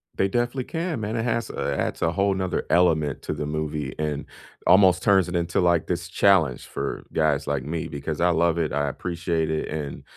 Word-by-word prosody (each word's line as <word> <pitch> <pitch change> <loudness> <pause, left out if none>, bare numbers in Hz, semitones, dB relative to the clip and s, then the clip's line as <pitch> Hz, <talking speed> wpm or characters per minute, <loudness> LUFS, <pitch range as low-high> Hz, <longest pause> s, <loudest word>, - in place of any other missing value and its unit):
They 95 - +2
definitely 120 +5 -1
can, 165 -3 -3
man, 110 +1 -3
it 115 - -1
has 115 -1 -1
a - - -2
adds - - -2
a 85 - +2
whole 100 +4 +1
'nother 95 -1 -2
element 80 -5 +2
to - - -3
the 75 - -4
movie 75 -2 -3
and 75 -1 -2 0.4
almost 95 -1 +5
turns 95 -3 +4
it 90 - -4
into, 85 0 0
like, 85 -2 +3
this - - -2
challenge 85 -11 +3
for - - -4
guys 75 -3 +1
like 70 -2 -1
me 80 +3 -3
because 75 +2 -5
I 90 +1 +3
love 85 0 +2
it, 80 -4 -1
I 75 +1 0
appreciate 85 +1 -2
it, 80 - -2
and 75 -2 -5
85 Hz, 205 wpm, -24 LUFS, 75-95 Hz, 0.4 s, almost